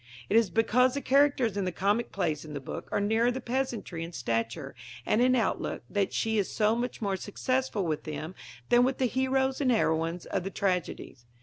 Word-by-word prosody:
It 205 - +1
is 225 -3 +5
because 250 +5 +3
the 280 - -2
characters 270 -6 +3
in 200 - 0
the 180 - -1
comic 205 +6 0
plays 165 -6 -1
in 150 -2 -8
the - - -3
book 135 - -7
are - - +1
nearer 225 +4 +2
the 250 +1 -2
peasantry 240 -9 -3
in 170 +1 -8
stature 115 -4 -2 0.3
and 220 - +2
in 255 +1 +4
outlook 230 -5 -1
that 200 -2 0
she 220 -1 0
is 195 - -1
so 215 0 +2
much 240 -1 -3
more 200 -1 0
successful 220 +2 -1
with 155 -2 -2
them 155 +3 -5 0.4
than 240 0 +6
with 260 +1 +1
the 260 - +1
heroes 265 +2 +1
and 265 - +2
heroines 165 -5 0
of - - -2
the 195 - -3
tragedies. 180 -10 -3
215 Hz, 205 wpm, -29 LUFS, 175-250 Hz, 0.4 s, than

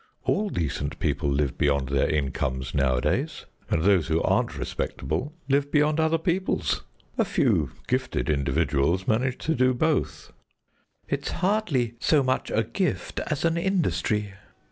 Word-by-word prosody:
All 210 +1 +1
decent 70 - -2
people 70 - 0
live 70 -1 0
beyond 70 -2 +2
their 70 -1 +2
incomes 65 -3 -1
nowadays, 65 -3 0 0.2
and 80 - +1
those 95 -4 +4
who 80 -1 +2
aren't - - +1
respectable 145 +4 -3 0.2
live 140 +1 +2
beyond 150 +1 +3
other 160 +1 +3
peoples. 180 +3 0 0.4
A - - +6
few - - +1 0.2
gifted - - -1
individuals 75 +4 +1
manage 125 +3 +1
to 160 - +2
do 130 -1 +3
both." 155 +3 -1 0.7
"It's - - -2
hardly 175 - 0
so 145 +2 +3
much 130 0 0
a 110 - +1
gift 180 - -2
as 155 0 -1
an 165 0 +2
industry." 155 - 0
115 Hz, 140 wpm, -26 LUFS, -, 0.7 s, A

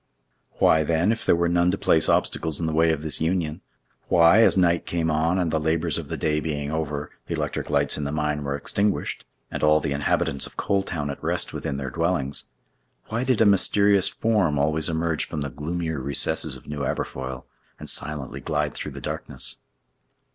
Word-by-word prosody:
Why, 80 - +4
then, 85 +6 +2
if 115 - -3
there - - +5
were 85 0 +1
none 85 +1 +2
to 95 - 0
place 80 -4 +3
obstacles 80 -3 +1
in 85 - -1
the 80 - -1
way 80 +1 +4
of 80 -2 -2
this 80 -1 -1
union—why, 85 +2 +1
as 110 - +5
night 85 -2 +2
came 80 -2 0
on, 80 +4 +1
and, 90 -3 0
the 80 - +1
labors 80 +1 0
of - - -7
the - - -4
day 75 -1 0
being 75 -2 -3
over, 75 -2 -3 0.2
the - - -2
electric - - -3
lights 70 +1 +2
in - - -3
the 70 - -2
mine 75 -1 -1
were 70 0 -2
extinguished, 100 +7 -1 0.3
and - - -4
all 75 0 +5
the 70 - -3
inhabitants 70 -1 0
of - - -17
Coal 100 -1 +1
Town 80 -7 -3
at 70 - -9
rest - - 0
within 70 - -3
their 65 -2 -4
dwellings—why 85 - -3
did 130 -4 +1
a - - +6
mysterious 100 0 +4
form 105 -10 +1
always 75 +2 +2
emerge 80 -1 0
from 75 - -5
the 70 -1 -4
gloomier 80 +2 -3
recesses 70 +1 +1
of - - -13
New 75 0 -6
Aberfoyle, 65 -1 -4 0.3
and - - -10
silently 75 -3 -4
glide - - -1
through - - -6
the - - -8
darkness? - - -4
80 Hz, 195 wpm, -24 LUFS, 75-85 Hz, 0.3 s, a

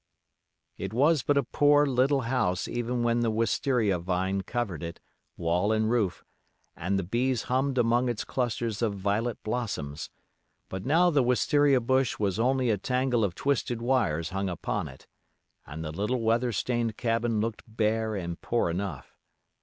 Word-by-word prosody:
It 95 +2 -5
was 145 +3 +4
but 145 +3 +1
a 140 - +3
poor, 145 +4 +4
little 135 +1 +2
house 115 -8 0
even 120 0 -2
when 120 0 +2
the 120 -1 +1
wistaria 110 -2 +1
vine 95 +2 -1
covered 100 -6 -3
it, 85 0 -6 0.4
wall 90 +5 +1
and 110 0 +1
roof, 105 -7 0 0.5
and 95 +4 -1
the 95 - -1
bees 120 +6 0
hummed 130 +1 0
among 120 +1 +3
its 120 -3 -2
clusters 120 -3 -2
of 110 -3 0
violet 105 +4 -1
blossoms; 90 -11 -3 0.6
but 95 +5 -5
now 175 +5 +4
the 145 -3 +3
wistaria 135 +2 +3
bush 130 +1 +1
was 100 -1 -1
only 130 0 +2
a 105 - 0
tangle 125 0 +1
of 95 -4 -1
twisted 135 -2 -1
wires 110 -11 0
hung 95 0 -2
upon 85 - -3
it, - - -13 0.6
and 80 +2 -6
the 75 - -4
little 105 +9 -1
weather 115 +2 +1
stained 115 0 -1
cabin 115 -1 0
looked 110 0 -2
bare 110 0 0
and 85 -3 -5
poor 115 -8 0
enough. 85 -7 -5
115 Hz, 160 wpm, -28 LUFS, 100-125 Hz, 0.6 s, was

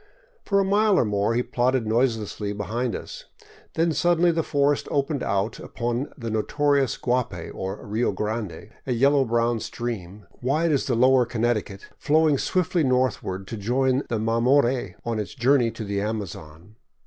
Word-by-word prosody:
For 200 -1 +2
a - - +3
mile 205 0 +3
or - - +3
more 105 +2 0
he 120 - +1
plodded 125 -1 0
noiselessly 110 -3 0
behind 115 +4 -2
us. - - -8 0.5
Then 165 +1 +2
suddenly 175 +1 +3
the 165 0 0
forest 145 -2 +1
opened 140 -1 -1
out 100 +3 -1
upon 120 +3 -3
the 115 -4 -5
notorious 140 +4 +1
Guapay, 125 -9 -2
or 95 +2 -5
Rio 110 +3 0
Grande, 105 0 -4 0.2
a 125 - +1
yellow 140 +3 +4
brown 115 0 +1
stream, 105 -5 -6 0.2
wide 155 +6 +1
as 140 - +1
the 125 - +1
lower 125 0 +4
Connecticut, 110 -4 -2
flowing 155 -2 +3
swiftly 180 -2 +1
north 130 -3 +1
ward 95 +1 -5
to 115 - -6
join 130 +5 +1
the 115 - 0
Mamore 120 -1 +2
on 115 -2 -1
its 105 +5 -5
journey 125 -1 +3
to 115 - -7
the 100 -1 -2
Amazon. 100 -3 -6
120 Hz, 160 wpm, -24 LUFS, 105-140 Hz, 0.5 s, yellow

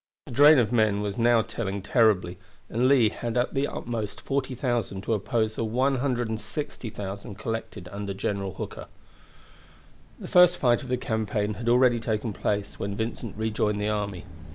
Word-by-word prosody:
The - - -10
drain 145 +5 +7
of 120 -3 +2
men 110 -4 +2
was 105 +3 -3
now 115 -1 +4
telling 100 -4 -4
terribly, 100 -6 +2 0.3
and 120 +3 +2
Lee 130 -5 +5
had 120 +1 -4
at 120 - +1
the 140 +1 +1
utmost 115 -4 -4
40,000 125 -7 -2
to 115 - 0
oppose 110 +1 0
the 115 - -3
160,000 115 -4 -2
collected 110 -3 -5
under 100 0 -4
General 100 -1 -3
Hooker. - - -7 1.3
The - - -7
first 180 0 +6
fight 120 -1 +3
of 130 - -9
the 125 - +1
campaign 110 -3 -1
had 115 +4 -3
already 120 -1 +4
taken 110 0 -2
place 100 +1 -2
when 100 0 -3
Vincent 110 -1 -4
rejoined 110 -1 0
the 105 +1 0
army. 100 -4 -3
110 Hz, 155 wpm, -26 LUFS, 105-120 Hz, 1.3 s, drain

